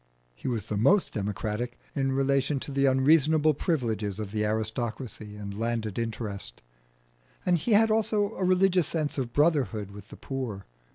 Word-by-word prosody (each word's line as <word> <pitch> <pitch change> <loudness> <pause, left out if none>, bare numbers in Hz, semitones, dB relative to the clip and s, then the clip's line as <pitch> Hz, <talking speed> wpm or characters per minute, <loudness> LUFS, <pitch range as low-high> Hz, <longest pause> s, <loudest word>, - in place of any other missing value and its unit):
He - - -8
was 115 -4 -1
the 105 - -3
most 180 - +3
democratic 105 +3 -3 0.2
in 135 -2 0
relation 135 +1 +1
to - - -6
the 140 0 +2
unreasonable 150 +3 +4
privileges 115 - -1
of 105 -2 -5
the 105 0 -1
aristocracy 110 0 -3
and 100 -1 -6
landed 115 -1 -2
interest; 105 - -5 0.8
and 180 - +4
he 195 +8 0
had 220 +1 +5
also 215 -1 +1
a - - -3
religious 185 -2 +3
sense 155 -3 -2
of 120 -3 -3
brotherhood 135 - +1
with 105 0 -11
the - - -12
poor. 125 -8 -5
130 Hz, 160 wpm, -28 LUFS, 110-155 Hz, 0.8 s, had